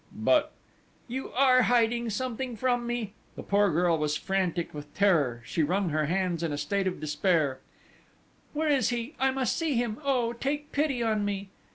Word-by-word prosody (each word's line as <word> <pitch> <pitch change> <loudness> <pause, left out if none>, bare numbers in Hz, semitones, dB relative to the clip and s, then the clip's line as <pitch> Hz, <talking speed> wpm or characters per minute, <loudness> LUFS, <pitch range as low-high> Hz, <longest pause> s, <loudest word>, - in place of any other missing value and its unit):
"But - - +2 0.3
..." - - -35
"You 265 - -4
are 255 0 +5
hiding 235 -1 +2
something 245 +2 -3
from 245 0 0
me!" 235 -4 -3 0.2
The - - -7
poor 200 0 +3
girl 170 0 +2
was 150 0 0
frantic 185 -3 -1
with 145 0 -8
terror: 150 -12 +2
she 165 - -1
wrung 180 +4 +1
her 155 -1 0
hands 180 -1 0
in 165 -2 -1
a 145 - -2
state 200 +5 -1
of 185 - -3
despair: 155 -3 +1 0.9
"Where 310 +1 0
is 275 -6 +3
he? 240 +4 -3
I 265 +1 +3
must 265 -2 0
see 320 -5 0
him! 235 -1 -1
Oh, 250 -4 +1
take 290 +4 -3
pity 280 -5 0
on 215 -2 +1
me!" 200 -1 -3
210 Hz, 185 wpm, -28 LUFS, 175-255 Hz, 0.9 s, are